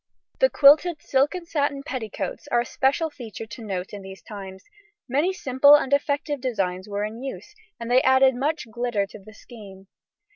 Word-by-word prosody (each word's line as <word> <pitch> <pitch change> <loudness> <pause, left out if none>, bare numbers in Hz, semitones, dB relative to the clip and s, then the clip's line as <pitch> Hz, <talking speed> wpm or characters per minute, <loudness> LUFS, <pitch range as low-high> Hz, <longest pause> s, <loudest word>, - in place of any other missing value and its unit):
The - - +5
quilted 300 - +5
silk 280 +2 +1
and 350 -2 -7
satin 285 -3 -1
petticoats 220 - -5
are 240 -4 +2
a - - -4
special 280 +7 0
feature 225 -5 -8
to 220 +2 -10
note 190 -3 -5
in 205 - -7
these 190 0 -11
times; 195 -2 -9 0.4
many 290 +8 +1
simple 285 -4 +5
and 280 -2 0
effective 285 0 0
designs 195 -6 -2
were 205 0 -2
in 220 +3 -7
use, 270 +9 -7 0.3
and 235 +1 -5
they 255 +1 +5
added 265 0 +5
much 285 +3 -2
glitter 240 -4 -1
to 200 - -13
the 215 +2 -15
scheme. 200 -5 -13
250 Hz, 180 wpm, -24 LUFS, 210-285 Hz, 0.4 s, The